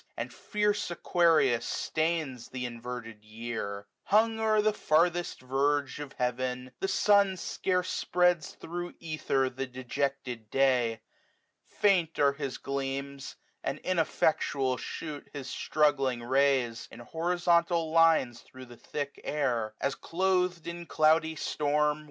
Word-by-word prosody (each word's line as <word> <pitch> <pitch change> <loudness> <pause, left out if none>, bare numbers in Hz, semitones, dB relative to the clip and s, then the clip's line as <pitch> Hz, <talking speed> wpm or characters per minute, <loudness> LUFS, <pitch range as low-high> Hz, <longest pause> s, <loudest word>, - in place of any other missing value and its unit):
And - - -4
fierce 210 -1 -1
Aquarius 165 -8 +3
stains 155 -7 -2
th' - - -16
inverted 120 -3 -6
year; 110 -2 -5 0.2
Hung 220 +2 +3
o'er 220 -1 +3
the 215 0 +3
farthest 175 -3 +1
verge 140 +2 0
of 145 -2 -7
heaven, 125 +1 -2
the 195 - -1
sun 200 -1 +4
Scarce 180 +1 -1
spreads 180 -2 +1
thro' 175 +1 -6
ether 155 -4 0
the 130 +1 -4
dejected 125 -2 -3
day. 125 -4 +2 0.7
45 - - -27
Faint 180 -5 +3
are 140 -1 +4
his 140 -2 -4
gleams, 140 0 -4 0.3
and - - -2
ineffectual 150 -6 +1
shoot 150 +1 -6
His 140 -3 -6
struggling 135 -4 +1
rays, 130 -2 +1
in 115 - -11
horizontal 170 +2 +1
lines. 160 -7 +4
Thro' 130 0 -13
the 120 -1 -14
thick 140 +3 -5
air 120 -7 -1
} - - -43
as 140 - 0
cloth'd 180 -1 0
in 170 0 -6
cloudy 160 +1 +3
storm. 150 0 0
145 Hz, 130 wpm, -29 LUFS, 125-170 Hz, 0.7 s, sun